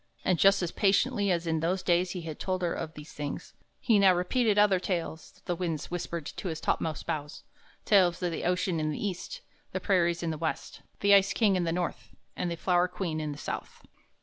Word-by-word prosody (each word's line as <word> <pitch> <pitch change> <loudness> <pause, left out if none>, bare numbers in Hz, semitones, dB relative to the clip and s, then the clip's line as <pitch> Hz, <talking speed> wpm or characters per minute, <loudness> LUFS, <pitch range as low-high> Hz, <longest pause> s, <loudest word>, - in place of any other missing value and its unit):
And, 180 -3 +2
just 195 -1 +5
as 170 - -2
patiently 205 +1 +2
as 175 -2 +1
in 160 -1 0
those 175 +4 -1
days 175 +1 +2
he 180 -1 -4
had 160 -2 -7
told 185 -1 -2
her 170 - +1
of 160 -1 -5
these 150 +1 -10
things, 145 -1 -6 0.3
he 220 -4 +3
now 190 -2 +6
repeated 210 +4 +1
other 205 -3 +5
tales 170 -3 -4
the 175 - -1
winds 165 -4 -3
whispered 170 -2 -4
to 185 - -6
his 160 -2 -3
topmost 160 -2 -1
boughs, 150 -3 -4 0.4
tales 185 -5 +4
of 175 - 0
the 165 - -4
ocean 180 -1 0
in 155 0 0
the 150 - -3
East, 180 -3 -6 0.3
the 185 - -1
prairies 175 -3 +1
in 165 - -1
the 155 - -5
West, 160 -1 -4 0.2
the 200 0 +5
ice 200 0 +5
king 210 -4 +3
in 180 -2 0
the 165 - 0
North, 175 0 -4 0.2
and 180 - -2
the 170 - -2
flower 180 +1 +2
queen 175 -3 -3
in 155 -1 -3
the 145 - -7
South. - - -6
175 Hz, 220 wpm, -29 LUFS, 165-190 Hz, 0.4 s, now